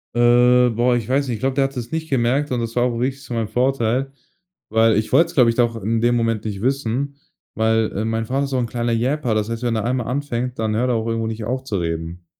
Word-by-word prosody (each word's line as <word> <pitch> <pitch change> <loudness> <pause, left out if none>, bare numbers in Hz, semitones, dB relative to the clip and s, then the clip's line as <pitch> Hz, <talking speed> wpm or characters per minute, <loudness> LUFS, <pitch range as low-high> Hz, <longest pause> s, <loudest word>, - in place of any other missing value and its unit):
Äh, 125 +1 +5
boah, 120 +2 +2
ich 120 -1 -3
weiß 140 +2 +1
nicht, 120 - -2
ich - - -8
glaube, 135 0 0
der 135 0 +3
hat 135 - -5
das 120 -1 -5
nicht 160 0 -3
gemerkt, 135 +3 +1
und 125 -2 0
das 115 0 -4
war 120 - +4
auch 125 -1 0
richtig 130 +3 -2
zu 125 - -7
meinem 115 -2 -2
Vorteil, 130 +1 0 0.6
weil 110 0 +3
ich 110 +1 -1
wollte 165 - +5
es, - - -11
glaube 125 -4 +5
ich, 115 - -1
da 120 - +5
auch 115 0 -6
in 115 +3 0
dem 120 +1 +3
Moment 115 -2 0
nicht 100 -3 -4
wissen 135 +2 -1 0.4
weil 110 0 +2
äh, 105 - -1
mein 115 0 -1
Vater 135 +4 -1
ist - - -6
so' 135 - -1
n 120 - 0
kleiner 120 0 -2
Yapper. 125 +2 0
Das 105 -1 0
heißt, 115 +1 -4
wenn 120 -2 0
er 110 - -2
einmal 125 -1 -1
anfängt, 125 -2 -3
dann 110 -1 0
hört 125 +3 +1
er 125 - +1
auch 110 0 -2
irgendwo 115 -1 -1
nicht 110 -1 -4
auf 130 +3 -2
zu 110 -6 -3
reden. 85 0 -4
120 Hz, 275 wpm, -21 LUFS, 115-130 Hz, 0.6 s, Äh